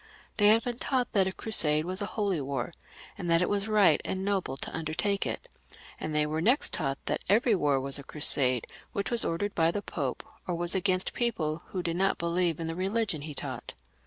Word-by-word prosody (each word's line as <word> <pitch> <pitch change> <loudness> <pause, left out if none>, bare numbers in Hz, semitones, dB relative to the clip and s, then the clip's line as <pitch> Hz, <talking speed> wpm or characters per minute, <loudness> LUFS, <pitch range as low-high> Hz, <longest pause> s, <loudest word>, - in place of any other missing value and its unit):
They 205 - +5
had 225 +2 +5
been 245 -1 -4
taught 255 -3 -1
that 195 -2 +3
a - - -1
crusade 155 -8 +4
was 185 +2 0
a 205 - -2
holy 200 -8 -1
war, 135 +2 -4 0.5
and 175 -3 -4
that 165 +1 +3
it - - -1
was 205 0 0
right 205 -8 +4
and 190 0 -3
noble 190 -9 -1
to - - -5
undertake 165 +6 -1
it, - - -5 0.5
and 155 -1 -4
they 150 0 +2
were 155 +1 -2
next 245 - +2
taught 135 -4 -1
that - - -2
every 225 +3 +3
war 145 -7 +1
was 135 +1 -1
a - - -9
crusade 130 -5 +3 0.3
which 200 +3 -2
was 235 -2 +5
ordered 205 +5 -2
by 165 -1 +2
the 200 +4 -3
Pope, 135 -6 -4 0.2
or 180 - -1
was 170 +1 +1
against 185 -1 0
people 170 -10 -1
who 185 -2 -4
did 170 0 -2
not 195 +1 +1
beUeve 170 -1 0
in 165 - -3
the 165 - -3
rehgion 190 -3 -1
he 150 -2 -7
taught. 130 -4 -6
175 Hz, 220 wpm, -28 LUFS, 155-205 Hz, 0.5 s, They